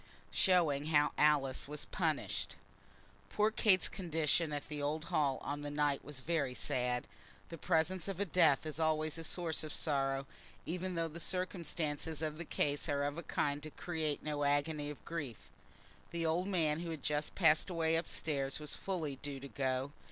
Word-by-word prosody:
Showing 160 Hz, -6 st, +3 dB
How 150 Hz, -2 st, +4 dB
Alice 145 Hz, -4 st, +3 dB
Was 150 Hz, 0 st, -4 dB
Punished. -, -, -1 dB, 0.7 s
Poor 210 Hz, +1 st, +2 dB
Kate's 200 Hz, -4 st, +4 dB
condition 165 Hz, -3 st, 0 dB
at 145 Hz, -1 st, -3 dB
the 150 Hz, -2 st, -4 dB
old 155 Hz, +3 st, -1 dB
Hall 140 Hz, -3 st, +3 dB
on 145 Hz, +1 st, -3 dB
that 145 Hz, -, -3 dB
night 145 Hz, -1 st, +1 dB
was 140 Hz, -2 st, -6 dB
very 140 Hz, -4 st, 0 dB
sad. 125 Hz, -1 st, 0 dB, 0.4 s
The 165 Hz, -, -7 dB
presence 170 Hz, +2 st, +1 dB
of 195 Hz, -2 st, -2 dB
death 160 Hz, -6 st, +5 dB
is 155 Hz, 0 st, -5 dB
always 155 Hz, 0 st, +1 dB
a -, -, -5 dB
source 165 Hz, -1 st, 0 dB
of 155 Hz, -, -5 dB
sorrow, 135 Hz, -3 st, 0 dB, 0.4 s
even 180 Hz, +2 st, -2 dB
though 165 Hz, 0 st, 0 dB
the 165 Hz, +1 st, -8 dB
circumstances 165 Hz, -4 st, -2 dB
of 155 Hz, 0 st, -2 dB
the 170 Hz, -, -4 dB
case 145 Hz, 0 st, 0 dB
are 140 Hz, -1 st, +1 dB
of 145 Hz, +3 st, -1 dB
a -, -, -3 dB
kind 145 Hz, -2 st, -1 dB
to 155 Hz, -, -6 dB
create 155 Hz, -2 st, -2 dB
no 150 Hz, -1 st, -1 dB
agony 145 Hz, +1 st, +1 dB
of 150 Hz, -, -9 dB
grief. 145 Hz, -, -5 dB, 0.6 s
The 170 Hz, -1 st, -2 dB
old 170 Hz, +4 st, +1 dB
man 160 Hz, -5 st, +1 dB
who 170 Hz, 0 st, -4 dB
had 160 Hz, -4 st, -5 dB
just 150 Hz, 0 st, -1 dB
passed 160 Hz, -1 st, +4 dB
away 165 Hz, -2 st, +1 dB
up 165 Hz, -, 0 dB
stairs 140 Hz, -3 st, 0 dB
was 150 Hz, -1 st, -5 dB
fully 160 Hz, -8 st, -3 dB
due 140 Hz, 0 st, -5 dB
to 140 Hz, -, -7 dB
go. 130 Hz, 0 st, -1 dB
155 Hz, 180 wpm, -35 LUFS, 145-165 Hz, 0.7 s, death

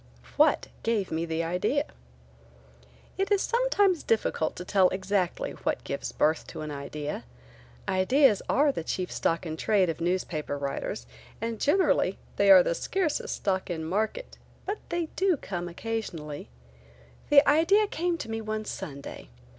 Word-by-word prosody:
WHAT -, -, +4 dB, 0.2 s
gave 220 Hz, -4 st, 0 dB
me 165 Hz, +1 st, -1 dB
the 160 Hz, 0 st, -1 dB
idea? 180 Hz, -, 0 dB, 1.3 s
It 390 Hz, +2 st, 0 dB
is 400 Hz, -1 st, +3 dB
sometimes 410 Hz, -8 st, +2 dB
difficult 215 Hz, -7 st, 0 dB
to 180 Hz, -, -7 dB
tell 190 Hz, -1 st, +4 dB
exactly 190 Hz, -1 st, -1 dB
what -, -, -3 dB
gives -, -, -4 dB
birth 155 Hz, +1 st, +1 dB
to -, -, -7 dB
an 155 Hz, -1 st, -5 dB
idea. 145 Hz, +1 st, -5 dB, 0.6 s
Ideas 215 Hz, +5 st, +4 dB
are 290 Hz, +1 st, +4 dB
the 165 Hz, -, -4 dB
chief 180 Hz, +2 st, -3 dB
stock 165 Hz, +2 st, 0 dB
in 160 Hz, -1 st, -4 dB
trade 190 Hz, -2 st, +2 dB
of 165 Hz, -, -9 dB
newspaper 170 Hz, -4 st, -1 dB
writers 140 Hz, -, -4 dB, 0.3 s
and 230 Hz, -1 st, -4 dB
generally 295 Hz, -, +3 dB, 0.2 s
they 200 Hz, 0 st, +4 dB
are 185 Hz, -2 st, +10 dB
the -, -, 0 dB
scarcest 345 Hz, -, -1 dB
stock 190 Hz, -2 st, -1 dB
in 160 Hz, -2 st, -3 dB
market, 220 Hz, -, -2 dB, 0.3 s
but 405 Hz, +2 st, -3 dB
they 345 Hz, -1 st, -1 dB
do 375 Hz, -4 st, +2 dB
come 175 Hz, -7 st, -5 dB
occasionally, 170 Hz, -, -5 dB, 0.8 s
This 290 Hz, -1 st, +8 dB
idea 335 Hz, +9 st, +4 dB
came 350 Hz, -3 st, -1 dB
to 265 Hz, -, -6 dB
me 225 Hz, 0 st, -2 dB
one 215 Hz, 0 st, -3 dB
Sunday. 140 Hz, -, -7 dB
195 Hz, 150 wpm, -28 LUFS, -, 1.3 s, are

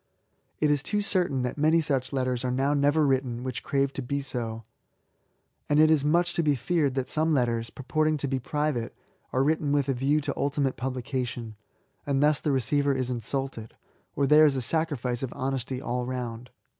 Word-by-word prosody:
It 150 Hz, -1 st, +2 dB
is 145 Hz, -2 st, +1 dB
too 205 Hz, +7 st, -1 dB
certain 175 Hz, -10 st, 0 dB
that 125 Hz, +3 st, -3 dB
many 155 Hz, +2 st, +4 dB
such 135 Hz, -5 st, -1 dB
letters 130 Hz, -2 st, -1 dB
are 130 Hz, -, -1 dB
now 135 Hz, +3 st, +1 dB
never 145 Hz, +2 st, +3 dB
written 130 Hz, -3 st, 0 dB
whicb 130 Hz, -2 st, -4 dB
crave 140 Hz, -1 st, 0 dB
to -, -, -4 dB
be 140 Hz, +3 st, -2 dB
so; 115 Hz, -5 st, -3 dB, 1.1 s
and 145 Hz, 0 st, +3 dB
it 155 Hz, 0 st, +6 dB
is 150 Hz, -3 st, +3 dB
much 175 Hz, +4 st, +2 dB
to -, -, +1 dB
be 150 Hz, -3 st, +2 dB
feared 145 Hz, 0 st, 0 dB
that 130 Hz, -1 st, -1 dB
some 155 Hz, 0 st, +1 dB
letters^ 115 Hz, -3 st, 0 dB
purporting 155 Hz, +4 st, 0 dB
to 140 Hz, -, -2 dB
be 135 Hz, 0 st, -1 dB
private^ 145 Hz, -3 st, -2 dB, 0.4 s
are 130 Hz, -, +2 dB
written 150 Hz, 0 st, +1 dB
with 145 Hz, -1 st, +1 dB
a -, -, +3 dB
view 135 Hz, +4 st, +1 dB
to -, -, -2 dB
ultimate 140 Hz, -1 st, 0 dB
publication; 125 Hz, -3 st, -4 dB, 0.5 s
and 140 Hz, 0 st, +1 dB
thus 150 Hz, -1 st, +3 dB
the 150 Hz, -, -1 dB
re 135 Hz, -1 st, +2 dB
ceiver 140 Hz, +3 st, +1 dB
is 130 Hz, -1 st, -1 dB
insulted^ 125 Hz, -2 st, -4 dB, 0.4 s
or 140 Hz, -, +2 dB
there 150 Hz, +2 st, +7 dB
is 140 Hz, -, +1 dB
a 130 Hz, -, -1 dB
sacrifice 130 Hz, -4 st, -1 dB
of 130 Hz, -3 st, -3 dB
honesty 130 Hz, -1 st, -3 dB
all 125 Hz, -1 st, -2 dB
round. 125 Hz, -1 st, -5 dB
135 Hz, 195 wpm, -27 LUFS, 125-150 Hz, 1.1 s, there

